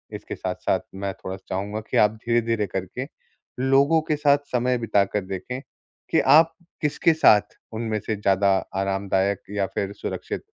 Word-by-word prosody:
इसके -, -, -7 dB
साथ-साथ -, -, -1 dB, 0.2 s
मैं 100 Hz, 0 st, -3 dB
थोड़ा-सा 95 Hz, 0 st, -8 dB
चाहूँगा 100 Hz, +3 st, -3 dB
कि -, -, 0 dB
आप 105 Hz, -, +5 dB
धीरे-धीरे 115 Hz, -2 st, +1 dB
करके 95 Hz, +8 st, -4 dB, 0.5 s
लोगों 135 Hz, +5 st, +4 dB
के 155 Hz, -, +3 dB
साथ 145 Hz, -1 st, +4 dB, 0.2 s
समय 125 Hz, +1 st, +2 dB
बिताकर 105 Hz, -3 st, +1 dB
देखें, 95 Hz, +7 st, -5 dB, 0.5 s
कि -, -, +4 dB
आप 165 Hz, +2 st, +6 dB, 0.3 s
किसके 150 Hz, +2 st, +2 dB
साथ 105 Hz, -9 st, +4 dB, 0.2 s
उनमें 110 Hz, -1 st, -2 dB
से 110 Hz, -, 0 dB
ज़्यादा 100 Hz, -1 st, +2 dB, 0.3 s
आरामदायक 95 Hz, 0 st, 0 dB
या 100 Hz, -1 st, 0 dB
फिर 100 Hz, 0 st, -2 dB
सुरक्षित -, -, -5 dB
105 Hz, 150 wpm, -24 LUFS, 100-125 Hz, 0.5 s, आप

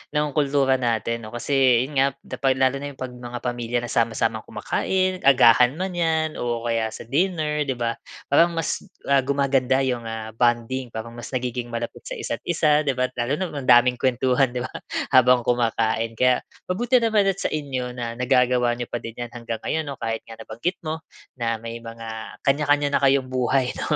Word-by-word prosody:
ng 150 Hz, 0 st, +1 dB
kultura 140 Hz, -2 st, +2 dB
natin 115 Hz, -1 st, -1 dB
'no, 110 Hz, -, -10 dB
kasi 130 Hz, -1 st, +3 dB
yun 145 Hz, -, -6 dB
nga 135 Hz, -, +5 dB, 0.2 s
da -, -, -7 dB
pag 135 Hz, -1 st, +3 dB
lalo 130 Hz, +1 st, +2 dB
na 145 Hz, 0 st, -6 dB
yung -, -, -20 dB
'pag 130 Hz, -, -3 dB
mga 120 Hz, -1 st, -7 dB
pamilya 120 Hz, -1 st, -2 dB
na 120 Hz, -, -6 dB
sama-samang 115 Hz, -1 st, 0 dB
kumakain 185 Hz, -1 st, -1 dB
agahan 125 Hz, -1 st, +6 dB
man 185 Hz, +3 st, -3 dB
'yan 160 Hz, -2 st, 0 dB
o 120 Hz, -1 st, -2 dB
kaya 115 Hz, -1 st, 0 dB
sa -, -, -8 dB
dinner, 150 Hz, -, 0 dB
'di 135 Hz, -, -1 dB
ba. 115 Hz, -1 st, -2 dB, 0.3 s
Parang 170 Hz, +4 st, +5 dB
mas, 165 Hz, -, -1 dB, 0.3 s
ah, 140 Hz, -1 st, +5 dB
gumaganda 135 Hz, -1 st, +2 dB
'yong 125 Hz, -3 st, -1 dB, 0.3 s
bonding, 120 Hz, +2 st, +1 dB
parang 110 Hz, +1 st, -6 dB
mas 120 Hz, -, -7 dB
nagiging 125 Hz, -1 st, -2 dB
malapit 115 Hz, -, -5 dB
isa't-isa, 155 Hz, -3 st, 0 dB
'di 135 Hz, -, +1 dB
ba. 130 Hz, 0 st, 0 dB
Lalo 120 Hz, +4 st, 0 dB
na 185 Hz, -, -1 dB
ang 140 Hz, -3 st, -6 dB
daming 125 Hz, 0 st, +6 dB
kuwentuhan, 130 Hz, 0 st, +2 dB
'di 125 Hz, -, -2 dB
ba, 130 Hz, -, -5 dB, 0.4 s
habang 125 Hz, -2 st, +5 dB
kumakain. 115 Hz, -1 st, 0 dB
Kaya 125 Hz, +2 st, +2 dB, 0.2 s
mabuti 240 Hz, +6 st, +2 dB
naman 220 Hz, -3 st, +3 dB
at 195 Hz, -1 st, 0 dB
sa -, -, 0 dB
inyo 135 Hz, -5 st, -3 dB
na 115 Hz, -1 st, -3 dB
nagagawa 125 Hz, -1 st, +2 dB
n'yo 120 Hz, -, -3 dB
pa 120 Hz, -, -5 dB
din 115 Hz, 0 st, -8 dB
'yan 120 Hz, -1 st, -6 dB
hanggang 115 Hz, -1 st, -5 dB
ngayon 160 Hz, -, 0 dB
'no, 135 Hz, -, -6 dB
kahit 115 Hz, -2 st, -3 dB
nga 115 Hz, -, -9 dB
nabanggit 115 Hz, +11 st, -4 dB
mo 155 Hz, +1 st, -3 dB, 0.4 s
na 115 Hz, -1 st, 0 dB
may 115 Hz, +1 st, -7 dB
mga 115 Hz, -1 st, -8 dB
kanya-kanya 145 Hz, 0 st, +2 dB
na -, -, +2 dB
kayong 135 Hz, -1 st, +3 dB
buhay 130 Hz, 0 st, +1 dB
'no. -, -, -7 dB
125 Hz, 190 wpm, -23 LUFS, 120-140 Hz, 0.4 s, agahan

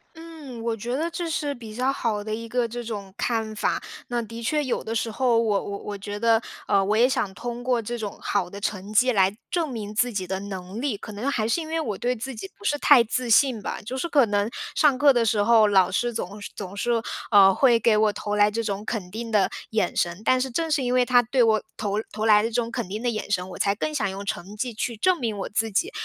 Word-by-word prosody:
嗯， 320 Hz, -7 st, -10 dB
我 230 Hz, -1 st, -1 dB
觉 235 Hz, +3 st, -4 dB
得 320 Hz, +5 st, -1 dB
这 335 Hz, 0 st, -3 dB
是 295 Hz, -2 st, -1 dB
比 225 Hz, -4 st, -10 dB
较 255 Hz, +3 st, +1 dB
好 220 Hz, -6 st, -2 dB
的 215 Hz, 0 st, -4 dB
一 230 Hz, +1 st, -5 dB
个 245 Hz, 0 st, 0 dB
这 240 Hz, +1 st, -6 dB
种 205 Hz, -4 st, -6 dB
看 225 Hz, -2 st, -1 dB
法。 -, -, 0 dB, 0.3 s
那 240 Hz, 0 st, -1 dB
的 230 Hz, +1 st, -8 dB
确 295 Hz, +6 st, 0 dB
有 260 Hz, -, -2 dB
的 225 Hz, -, -4 dB
时 225 Hz, 0 st, -1 dB
候， 240 Hz, +1 st, +2 dB
我 210 Hz, -4 st, +1 dB
我 200 Hz, -, -5 dB
我 205 Hz, -1 st, -6 dB
觉 205 Hz, +1 st, -6 dB
得， 230 Hz, 0 st, +3 dB, 0.3 s
呃， 195 Hz, -1 st, +3 dB
我 205 Hz, +2 st, +1 dB
也 240 Hz, +2 st, +6 dB
想 210 Hz, -6 st, -1 dB
通 240 Hz, +2 st, -5 dB
过 250 Hz, -1 st, +1 dB
这 240 Hz, +2 st, -4 dB
种 210 Hz, -3 st, -5 dB
好 175 Hz, -, -1 dB
的 200 Hz, -, -8 dB
成 200 Hz, -1 st, -4 dB
绩 250 Hz, +4 st, +4 dB
来 195 Hz, -3 st, +3 dB, 0.2 s
证 335 Hz, -4 st, 0 dB
明 215 Hz, -4 st, -5 dB
自 245 Hz, +3 st, +1 dB
己 190 Hz, -2 st, -2 dB
的 190 Hz, +1 st, -3 dB
能 195 Hz, +1 st, -6 dB
力， 265 Hz, -7 st, -1 dB
可 215 Hz, -, -9 dB
能 215 Hz, +7 st, -3 dB
还 220 Hz, -6 st, 0 dB
是 285 Hz, +9 st, +1 dB
因 315 Hz, -, -7 dB
为 325 Hz, +1 st, -1 dB
我 215 Hz, -11 st, -3 dB
对 245 Hz, +4 st, 0 dB
自 260 Hz, +4 st, -6 dB
己 195 Hz, -3 st, -7 dB
不 -, -, -17 dB
是 290 Hz, +5 st, +2 dB
太 280 Hz, -5 st, +7 dB
自 245 Hz, +2 st, -2 dB
信 245 Hz, -1 st, +4 dB
吧。 -, -, -4 dB
就 245 Hz, +4 st, -4 dB
是 305 Hz, -, -2 dB
可 280 Hz, -5 st, +5 dB
能 205 Hz, +1 st, 0 dB, 0.3 s
上 290 Hz, -4 st, +4 dB
课 285 Hz, +1 st, +6 dB
的 240 Hz, -2 st, +2 dB
时 215 Hz, -2 st, +2 dB
候， 225 Hz, -1 st, +5 dB
老 190 Hz, -3 st, +4 dB
师 240 Hz, +5 st, 0 dB
总 205 Hz, -2 st, -5 dB
是 -, -, -6 dB
总 195 Hz, -1 st, -7 dB
是， 240 Hz, +4 st, -1 dB, 0.4 s
呃， 195 Hz, -2 st, +7 dB
会 240 Hz, +1 st, +4 dB
给 230 Hz, -2 st, +3 dB
我 215 Hz, -1 st, +3 dB
投 205 Hz, 0 st, -3 dB
来 205 Hz, 0 st, +5 dB
这 230 Hz, +2 st, -2 dB
种 205 Hz, -2 st, -3 dB
肯 200 Hz, -6 st, -4 dB
定 230 Hz, +3 st, -5 dB
的 200 Hz, -4 st, +3 dB, 0.2 s
眼 215 Hz, -5 st, 0 dB
神， 175 Hz, +3 st, -1 dB
但 255 Hz, -, +4 dB
是 265 Hz, -, -1 dB
正 320 Hz, +6 st, -2 dB
是 290 Hz, -, +2 dB
因 245 Hz, 0 st, 0 dB
为 250 Hz, -1 st, +4 dB
他 245 Hz, 0 st, +5 dB
对 245 Hz, +2 st, +2 dB
我 220 Hz, -2 st, +3 dB, 0.2 s
投 205 Hz, -1 st, -1 dB
投 215 Hz, +1 st, -3 dB
来 210 Hz, -1 st, +6 dB
的 225 Hz, -, -1 dB
这 -, -, -13 dB
种 235 Hz, -1 st, 0 dB
肯 235 Hz, -4 st, -3 dB
定 210 Hz, +4 st, -5 dB
的 245 Hz, -, +1 dB
眼 215 Hz, -3 st, -4 dB
神， 185 Hz, -3 st, 0 dB
我 -, -, -8 dB
才 200 Hz, -, +2 dB
更 305 Hz, +8 st, -3 dB
想 215 Hz, -9 st, 0 dB
用 195 Hz, +1 st, -6 dB
成 200 Hz, -1 st, -5 dB
绩 245 Hz, +2 st, -2 dB
去 235 Hz, +2 st, -3 dB
证 365 Hz, -, +2 dB
明 225 Hz, -5 st, -2 dB
我 195 Hz, -, -4 dB
自 225 Hz, +2 st, 0 dB
己， 340 Hz, -, 0 dB
225 Hz, 290 characters per minute, -25 LUFS, 205-250 Hz, 0.4 s, 太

